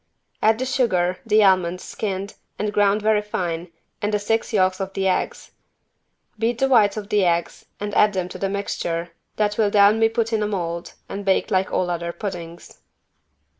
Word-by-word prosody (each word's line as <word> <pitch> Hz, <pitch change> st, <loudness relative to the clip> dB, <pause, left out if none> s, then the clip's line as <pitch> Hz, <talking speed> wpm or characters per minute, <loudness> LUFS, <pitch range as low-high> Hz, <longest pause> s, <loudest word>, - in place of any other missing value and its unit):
Add 220 Hz, 0 st, +4 dB
the 255 Hz, -, -2 dB
sugar, 185 Hz, -9 st, +1 dB
the 215 Hz, 0 st, +5 dB
almonds 185 Hz, -2 st, +2 dB
skinned 200 Hz, -1 st, -4 dB, 0.2 s
and 210 Hz, 0 st, -2 dB
ground 205 Hz, 0 st, +2 dB
very 215 Hz, -1 st, +3 dB
fine 175 Hz, -4 st, -4 dB, 0.3 s
and 205 Hz, 0 st, 0 dB
the 210 Hz, -, +2 dB
six 225 Hz, +2 st, -1 dB
yolks 185 Hz, -3 st, +2 dB
of 195 Hz, 0 st, -4 dB
the 190 Hz, 0 st, 0 dB
eggs. 185 Hz, -, -2 dB, 0.9 s
Beat 230 Hz, +1 st, 0 dB
the 270 Hz, -, +2 dB
whites 220 Hz, -6 st, +4 dB
of 205 Hz, -1 st, -6 dB
the 205 Hz, -2 st, +3 dB
eggs 170 Hz, -1 st, -1 dB
and 205 Hz, 0 st, -4 dB
add 210 Hz, 0 st, +4 dB
them 185 Hz, -2 st, -2 dB
to -, -, -8 dB
the 195 Hz, -, -1 dB
mixture 175 Hz, -4 st, -3 dB, 0.2 s
that 210 Hz, 0 st, 0 dB
will 210 Hz, -2 st, +4 dB
then 205 Hz, +1 st, +5 dB
be 225 Hz, 0 st, +4 dB
put 225 Hz, 0 st, -1 dB
in 220 Hz, -, +1 dB
a 210 Hz, -, 0 dB
mold 170 Hz, -4 st, -4 dB
and 200 Hz, +1 st, -6 dB
baked 195 Hz, +3 st, +1 dB
like 190 Hz, -1 st, +1 dB
all 180 Hz, -1 st, 0 dB
other 170 Hz, 0 st, -3 dB
puddings. 175 Hz, -3 st, -7 dB
200 Hz, 190 wpm, -22 LUFS, 185-215 Hz, 0.9 s, the